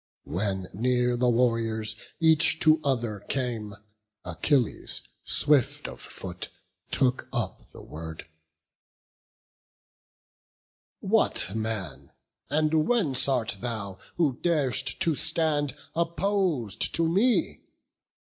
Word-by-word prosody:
When 95 +1 -2
near 125 +3 +1
the 125 0 +2
warriors, 115 -2 +1 0.2
each 160 -1 +4
to 155 -1 +5
other, 120 -6 -1
came, 115 -6 -2 0.5
Achilles, 120 - +1 0.2
swift 145 -4 +3
of - - -9
foot, - - -7 0.4
took 130 -1 +1
up - - -4
the - - -13
word: 80 0 -8 2.8
"What 95 - +2
man, 110 -8 -4 0.4
and 155 +2 +2
whence 175 - +3
art 125 -6 0
thou, 100 -5 -5 0.2
who 145 -8 +1
dar'st 135 -7 +1
to 170 -4 +3
stand 150 -1 0 0.2
Oppos'd 170 - 0
to 165 0 +2
me? 210 +9 +2
125 Hz, 95 wpm, -27 LUFS, 110-155 Hz, 2.8 s, to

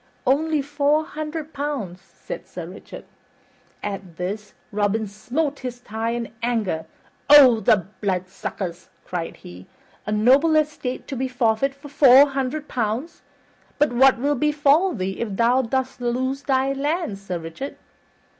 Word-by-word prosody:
"Only 295 +3 +2
four 290 +2 +1
hundred 310 0 -6
pounds," 275 -11 -4
said 190 -3 -9
Sir 175 -2 -7
Richard. 180 +4 -11 0.8
At 195 -4 -5
this, 205 +4 -5 0.2
Robin 210 +1 0
smote 265 +9 -3
his 250 -2 -5
thigh 225 -1 -4
in 235 -1 -4
anger. 215 -9 -1 0.4
"O 270 -6 +9
the 195 -3 +3 0.2
bloodsuckers!" 185 -2 -4 0.2
cried 170 -2 -4
he. 90 +2 -12 0.4
"A - - -1
noble 265 +9 +4
estate 300 -4 -1
to 275 - -3
be 260 +1 -1
forfeit 245 +2 +1
for 280 +1 -12
four 275 0 +7
hundred 275 +2 -3
pounds! 245 +7 -3 0.6
But 295 -3 +2
what 260 +2 +5
will 285 +4 +1
befall 300 +5 +2
thee 190 -1 -3
if 215 -4 -3
thou 240 +4 +3
dost 260 +1 -2
lose 260 +3 -1
thy 270 -1 +1
lands, 285 - -2
Sir 180 - -2
Richard?" 165 +12 -7
250 Hz, 140 wpm, -23 LUFS, 210-285 Hz, 0.8 s, O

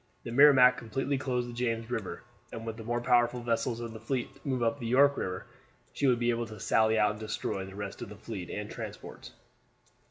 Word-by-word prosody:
The 120 - -6
Merrimac 130 -1 +7
completely 135 +5 -2
closed 125 -3 -1
the 120 - -7
James 115 -1 -2
River; 110 -6 -4 0.3
and 115 0 -7
were 115 - -2
the 110 0 -9
more 120 +2 -1
powerful 120 0 +3
vessels 120 0 -1
of 115 -1 -6
the 110 - -8
fleet 125 +3 -3
to 135 +2 -14
move 130 -3 0
up 115 0 0
the 115 - -4
York 140 +4 +5
River, 90 -6 -4 0.5
she 140 - +1
would 125 -2 +4
be 120 0 +1
able 115 0 -2
to 110 -1 -10
sally 110 0 +3
out 105 -1 +4
and 105 - -8
destroy 105 -3 -3
the 95 0 -11
rest 100 -1 -6
of 120 - -6
the 105 - -9
fleet 100 -4 -7
and - - -4
the - - -9
transports. - - -8
120 Hz, 230 wpm, -30 LUFS, 110-125 Hz, 0.5 s, Merrimac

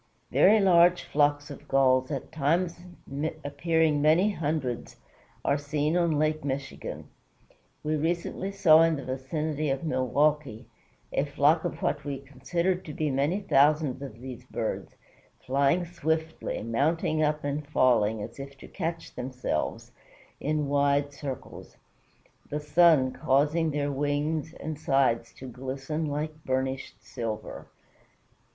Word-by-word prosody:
Very 215 +1 +6
large 180 -2 +5
flocks 145 0 +1
of 145 +1 -11
Gulls, 130 -1 +3
at 140 -3 -5
times 165 +4 0 0.7
appearing 155 +1 +1
many 165 +8 +4
hundreds, 150 - -3 0.5
are 140 +1 +2
seen 150 +2 -1
on 170 -4 +2
Lake 155 0 0
Michigan. 140 0 -5 0.8
We 155 +1 0
recently 175 +4 -2
saw 165 -5 +6
in 165 -1 +4
the 140 - -6
vicinity 150 +3 -2
of 135 +2 -1
Milwaukee 140 -2 0 0.5
a - - +2
flock 145 +3 +2
of - - -4
what 145 0 0
we 140 -2 -3
considered 145 +8 -2
to 150 - -7
be 155 -2 0
many 145 +9 0
thousands 150 -5 +3
of 125 -5 -8
these 125 -1 -8
birds, 115 -3 -4 0.5
flying 140 +7 +2
swiftly, 160 -1 -2
mounting 155 +7 0
up, 150 0 +1
and 145 +1 -3
falling, 110 -7 +2
as - - -9
if 140 0 -8
to - - -12
catch 165 -2 -4
themselves, 125 -10 -3 0.5
in 150 -1 -1
wide 140 0 +2
circles, 140 -2 -8 0.7
the 150 - -2
sun 150 -3 +4
causing 150 +6 +2
their 145 -1 -1
wings 145 +3 -1
and 155 -1 -6
sides 135 -6 +1
to 130 - -10
glisten 135 +5 -4
like 150 +1 -4
burnished 130 0 -3
silver. 115 -4 -5
145 Hz, 130 wpm, -28 LUFS, 135-160 Hz, 0.8 s, Very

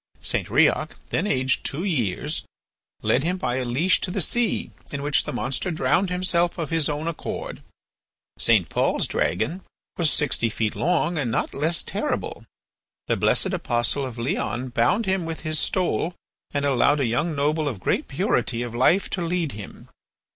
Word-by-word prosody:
St. - - 0
Riok, - - +3 0.2
then - - +1
aged 130 -5 +1
two 150 +6 -1
years, 125 - -1 0.6
led 130 - +3
him 180 +3 0
by 125 -9 -1
a 130 - 0
leash 150 +10 +2
to - - -1
the 190 - -2
sea, 235 +5 0 0.2
in 140 -1 -4
which 145 -1 +2
the - - -3
monster 130 +8 -2
drowned 160 +4 +1
himself 180 -1 +1
of 165 -3 -3
his 160 -3 +1
own 150 +2 -2
accord. 170 - -5 0.8
St. - - +4
Pol's - - +1
dragon 180 +5 -1 0.4
was 165 -3 +3
sixty 140 -5 +1
feet 110 -1 -1
long 170 -1 +1
and 130 -5 -1
not 115 - -1
less 160 +4 +1
terrible. - - -3 0.6
The - - +1
blessed - - +2
apostle 120 +4 0
of 125 -3 -5
Leon 125 +1 -2
bound 120 - +2
him 190 -1 +1
with 165 -1 -4
his 155 -1 0
stole 180 -2 0 0.4
and 145 -1 -1
allowed 140 +2 +3
a 135 - +2
young 150 +8 0
noble 150 +2 +1
of 115 -8 -6
great - - 0
purity 115 +1 0
of 120 -1 -6
life 130 +11 +3
to 185 - -2
lead 170 -3 -1
him. 105 -3 -10
150 Hz, 170 wpm, -24 LUFS, 125-175 Hz, 0.8 s, St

